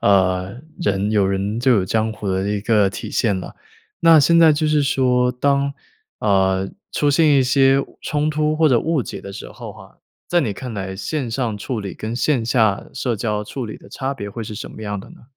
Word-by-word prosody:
呃， 95 +2 +2 0.2
人 100 - 0
有 105 -3 +3
人 100 +4 -1
就 130 +1 +3
有 100 -5 +3
江 110 +3 0
湖 105 -1 -6
的 95 +1 -1
一 105 -1 -1
个 105 -3 +2
体 - - -7
现 105 -5 +1
了。 - - -8 0.5
那 165 -1 +7
现 170 +4 +5
在 160 -2 +7
就 155 +1 0
是 150 -1 +2
说 125 -3 +2
当， 140 +2 +1 0.5
呃， 95 -1 +1 0.2
出 145 - 0
现 155 +2 +4
一 135 - +4
些 135 0 +3 0.2
冲 150 0 -1
突 155 0 0
或 160 -1 +4
者 120 -3 +3
误 160 -3 0
解 - - -7
的 100 - -9
时 100 - -8
候 - - -9
哈， - - -16 0.3
在 175 - +3
你 110 - -1
看 115 +3 -7
来 95 -1 -5
线 130 +2 -3
上 115 -3 -2
处 120 +3 -4
理 100 -2 -5
跟 110 +2 -5
线 125 -3 +1
下 110 -5 +1
社 125 -3 -2
交 105 -1 -2
处 130 +4 -5
理 110 - -7
的 - - -16
差 135 +1 -3
别 100 -7 -6
会 115 +3 -6
是 110 - -7
什 - - -6
么 110 - -10
样 105 -1 -3
的 - - -11
呢？ - - -16
115 Hz, 240 characters per minute, -20 LUFS, 100-140 Hz, 0.5 s, 那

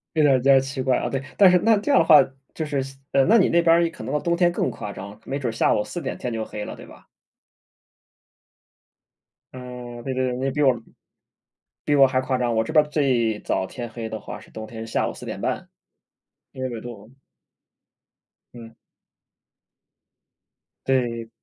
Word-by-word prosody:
有 155 - +3
点 135 -3 +5
比 125 - -8
较 135 -1 +7
奇 135 0 -4
怪 130 -1 +2
啊。 - - -2
对， 135 -1 -3
但 195 -2 +8
是 180 - +5
那 225 +2 +4
这 210 +8 -1
样 280 - +6
的 - - +3
话 155 - +8 0.4
就 160 - -3
是 145 -2 -1 0.3
呃， 135 - +4
那 225 +4 +5
你 190 - +4
那 170 - +4
边 170 0 +4
可 - - -10
能 135 - -4
到 150 - +1
冬 170 +3 0
天 175 0 +3
更 170 - -1
夸 105 -2 -7
张， 100 +2 -9
没 140 - -3
准 125 -4 -2
下 110 - +2
午 105 - 0
4:00 175 +9 -5
天 125 - -4
就 110 -1 -2
黑 105 -1 -6
了， - - -7
对 - - -12
吧？ - - -16 2.5
嗯， 125 -2 -9
对 135 - -3
对 130 0 0
对。 125 0 -2
你 130 - -4
也 135 - 0
比 150 +3 -2
我 130 -4 +3 1.1
比 145 - +1
我 140 -1 +7
还 130 0 0
夸 130 0 -1
张。 120 -2 0
我 110 0 +1
这 110 - -6
边 155 -1 +6
儿 - - -14
最 125 -8 +1
早 95 - -1
天 120 +3 -7
黑 115 -1 -6
的 110 - -5
话 - - -8
是 - - -17
冬 110 0 -8
天 110 0 -8
下 115 - -1
午 - - -4
4:30。 - - -4 0.8
因 130 - -8
为 130 - -1
纬 115 -2 -6
度 115 -2 -10 1.4
嗯。 115 -1 -11 2.1
对。 120 -3 0
130 Hz, 205 characters per minute, -23 LUFS, 115-150 Hz, 2.5 s, 但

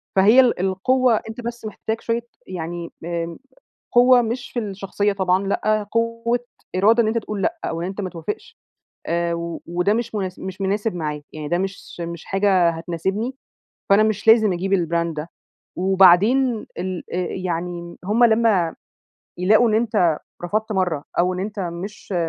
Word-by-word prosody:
فهي 205 +6 +6
ال 250 -6 +4
القوّة 230 +7 +2
أنت 220 +2 -7
بس 235 -1 -6
محتاج 220 +1 -4
شويّة 230 0 -1 0.3
يعني 170 -1 -5
آمم 170 -1 -3 0.5
قوّة 245 +1 +6
مش 235 +2 -4
في 245 - -2
الشخصيّة 200 -1 -2
طبعًا، 190 0 +1
لأ 215 +1 0
قوّة 230 +1 0 0.4
إرادة 220 +5 +5
إن - - 0
أنت 225 +1 0
تقول 210 -2 -3
لأ، 340 - 0
أو 165 0 -3
إن 175 - -2
أنت 195 +2 -5
ما 185 - -3
توافقش 175 +3 -6 0.5
آآ 170 0 0
و 170 0 -5
وده 180 +4 +1
مش 235 0 -3
مُناس 190 -3 -3
مش 190 0 -7
مناسب 205 +2 0
معايا، 150 -3 -3
يعني 155 -1 -6
ده 175 - +1
مش 195 +1 -3 0.2
س - - -11
مش 170 -1 -5
حاجة 195 -3 +3
هتناسبني، 190 +9 -3 0.5
فأنا 200 +2 +6
مش 215 -1 0
لازم 220 -3 +6
أجيب 185 +2 -2
البراند 170 -2 +1
ده، 155 +3 -5 0.5
وبعدين 195 +7 +4
ال 185 0 -4
آآ - - -2
يعني 175 -1 -4
هُم 215 +5 +3
لمّا 220 -7 +3 0.6
يلاقوا 215 +6 +4
إن - - +1
أنت 210 -8 +2 0.3
رفضت 215 +5 -1
مرّة، 180 -7 0
أو 180 +1 +3
إن 180 - -4
أنت 205 +1 -4
مش 185 +3 -6
195 Hz, 165 wpm, -22 LUFS, 175-220 Hz, 0.6 s, فهي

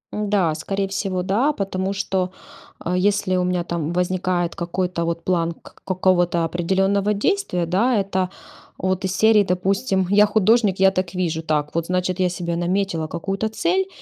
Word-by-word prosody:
Да, 205 -6 +1
скорее 195 +5 -2
всего 195 -2 -2
да, 225 +11 +1
потому 195 -3 -2
что, 190 -2 -1 0.5
э, 180 - -1
если 200 0 +1
у 180 - +1
меня 180 -1 0
там 170 -2 -3
возникает 180 -1 0
какой-то 175 -1 -2
вот 170 0 -3
план 170 -2 0
к - - -18
какого-то 175 -2 +2
определенного 195 +5 +1
действия, 205 - 0
да, 215 +8 +2
это 190 -2 -1 0.5
вот 185 +1 -1
из 190 0 -2
серии, 220 -2 +5
допустим, 190 +2 0
"я 210 +1 +6
художник, 210 -1 +3
я 190 0 +6
так 185 -1 -3
вижу", 170 -3 -1
так 150 -2 -1
вот, 165 0 -1
значит, 180 0 -1
я 185 -1 +2
себе 170 -1 -3
наметила 175 -1 -1
какую-то 195 +6 -3
цель 365 - 0
185 Hz, 165 wpm, -22 LUFS, 175-200 Hz, 0.5 s, я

